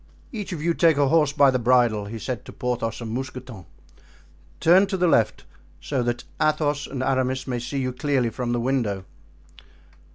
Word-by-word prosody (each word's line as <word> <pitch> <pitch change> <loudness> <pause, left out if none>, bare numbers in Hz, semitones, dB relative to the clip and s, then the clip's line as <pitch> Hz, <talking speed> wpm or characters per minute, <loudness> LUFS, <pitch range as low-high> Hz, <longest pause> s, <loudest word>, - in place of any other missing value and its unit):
"Each 210 -4 -5
of 160 -4 -5
you 170 0 +2
take 165 -3 +3
a 140 -2 +3
horse 155 -2 +3
by 140 -2 +5
the 130 - 0
bridle," 120 -4 +3
he 110 +3 -6
said 125 +2 -4
to - - -9
Porthos 120 -2 -3
and 115 -2 -5
Mousqueton; 125 -6 -6 0.9
"turn 185 +4 +5
to 190 -1 -2
the 180 - +2
left, 115 -9 +2 0.4
so 135 -3 -2
that 120 0 -2 0.2
Athos 150 -1 +1
and 130 -2 -4
Aramis 130 0 0
may 125 -2 -2
see 125 +4 -5
you 130 -1 -2
clearly 130 -3 0
from 125 -1 -3
the 120 - 0
window." 115 -7 -1
130 Hz, 185 wpm, -24 LUFS, 120-145 Hz, 0.9 s, by